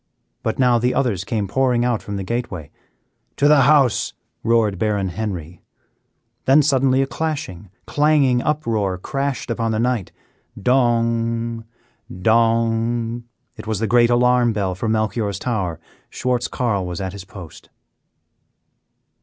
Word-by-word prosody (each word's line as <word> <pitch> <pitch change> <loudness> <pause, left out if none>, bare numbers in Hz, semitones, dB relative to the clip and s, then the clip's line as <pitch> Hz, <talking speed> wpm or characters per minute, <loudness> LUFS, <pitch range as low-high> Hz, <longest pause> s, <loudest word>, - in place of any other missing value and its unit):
But 110 - -2
now 125 -2 +3
the 125 +2 0
others 110 -9 0
came 105 -1 -2
pouring 125 +2 +1
out 120 -3 0
from 105 - -6
the 100 - -3
gateway. 95 -8 -4 0.7
"To 145 - +3
the 150 -1 +6
house," 135 -3 +3 0.3
roared 110 -4 +2
Baron 105 -3 0
Henry. 90 -3 -5 0.8
Then 140 +3 +5
suddenly 135 -2 +3
a - - -1
clashing, 135 - -4 0.2
clanging 145 -4 +2
uproar 115 -11 -1
crashed 135 +7 -3
out - - +2
upon 115 -1 -1
the 110 - -1
night. 120 -5 -1 0.5
Dong! 115 -1 +1 0.5
Dong! 115 +3 +1 0.3
It - - -9
was 110 -1 -1
the 110 - -1
great 120 +2 +4
alarm 120 -1 +3
bell 100 -3 -1
from 110 +5 -2
Melchior's 110 -2 -1
tower 100 -9 -2 0.3
Schwartz 125 -1 -1
Carl 100 -7 -1
was 90 -1 -5
at 95 -1 -4
his 100 -2 -8
post. 90 -5 -12
115 Hz, 135 wpm, -20 LUFS, 100-125 Hz, 0.8 s, the